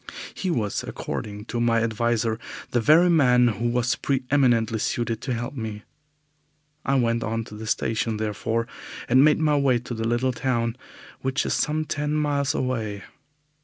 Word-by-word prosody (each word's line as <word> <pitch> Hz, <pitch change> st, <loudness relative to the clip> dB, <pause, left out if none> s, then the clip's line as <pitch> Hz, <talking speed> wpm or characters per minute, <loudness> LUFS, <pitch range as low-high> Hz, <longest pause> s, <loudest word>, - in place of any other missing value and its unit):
He 190 Hz, -, -3 dB
was, 110 Hz, -, -1 dB
according 105 Hz, 0 st, -5 dB
to 120 Hz, 0 st, -3 dB
my 115 Hz, -1 st, +3 dB
adviser, 115 Hz, 0 st, 0 dB, 0.3 s
the 120 Hz, -, +2 dB
very 160 Hz, +9 st, +6 dB
man 125 Hz, -7 st, +5 dB
who 115 Hz, +2 st, -2 dB
was 120 Hz, 0 st, +1 dB
pre 135 Hz, -2 st, -1 dB
eminently 115 Hz, -6 st, +3 dB
suited 115 Hz, 0 st, -1 dB
to 130 Hz, -, -2 dB
help 120 Hz, +3 st, -4 dB
me. 110 Hz, -5 st, -5 dB, 1.0 s
I 135 Hz, -, +1 dB
went 115 Hz, -2 st, +1 dB
on 115 Hz, 0 st, -2 dB
to 105 Hz, -, -11 dB
the 110 Hz, +1 st, -7 dB
station, 110 Hz, 0 st, 0 dB
therefore, 110 Hz, +2 st, -1 dB, 0.4 s
and 130 Hz, +3 st, +5 dB
made 150 Hz, 0 st, +5 dB
my 150 Hz, -2 st, +3 dB
way 135 Hz, -3 st, +3 dB
to 120 Hz, +1 st, -6 dB
the 115 Hz, -1 st, -2 dB
little 120 Hz, +2 st, +1 dB
town, 120 Hz, -2 st, -1 dB, 0.5 s
which 130 Hz, +2 st, 0 dB
is -, -, 0 dB
some 155 Hz, +1 st, 0 dB
ten 150 Hz, 0 st, -2 dB
miles 145 Hz, -2 st, 0 dB
away. 110 Hz, -6 st, -2 dB
120 Hz, 165 wpm, -24 LUFS, 115-135 Hz, 1.0 s, very